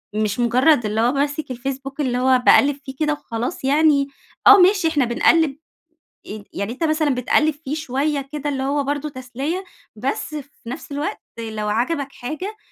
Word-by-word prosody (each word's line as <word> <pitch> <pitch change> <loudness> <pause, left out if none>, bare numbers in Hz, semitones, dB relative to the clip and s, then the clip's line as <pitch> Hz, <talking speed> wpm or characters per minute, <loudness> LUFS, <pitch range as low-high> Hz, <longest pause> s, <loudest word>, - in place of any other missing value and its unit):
مش 215 +1 -1
مُجرّد 245 +2 +3
اللي 210 +1 0
هو 240 +2 +3
ماسك 285 +1 -2
الFacebook 270 +2 -5
اللي 255 -4 0
هو 255 0 +3
باقلِّب 285 0 +6
فيه 265 -1 -7
كده 305 -1 +1
وخلاص 245 +1 -5
يعني 285 0 +3 0.4
آه. 410 - +11
ماشي 375 -1 +4
إحنا 295 -5 +2
بنقلِّب 280 +4 +3 0.7
ي 210 0 -8
يعني 200 +3 -3
أنت 270 +7 -3
مثلًا 310 -3 +1
بتقلِّب 290 +5 +2
فيه 295 -1 -5
شوية 285 -1 -2
كده 295 -1 -3
اللي 270 -2 -2
هو 280 +1 0
برضه 290 +2 -2
تسلية، 275 +7 -4 0.3
بس 270 +6 -3
في 285 -5 -9
نفس 285 +3 -7
الوقت 295 +9 -3 0.2
لو 220 -2 -4
عَجَبك 275 +6 -1
حاجة 335 - -6
275 Hz, 170 wpm, -21 LUFS, 250-305 Hz, 0.7 s, آه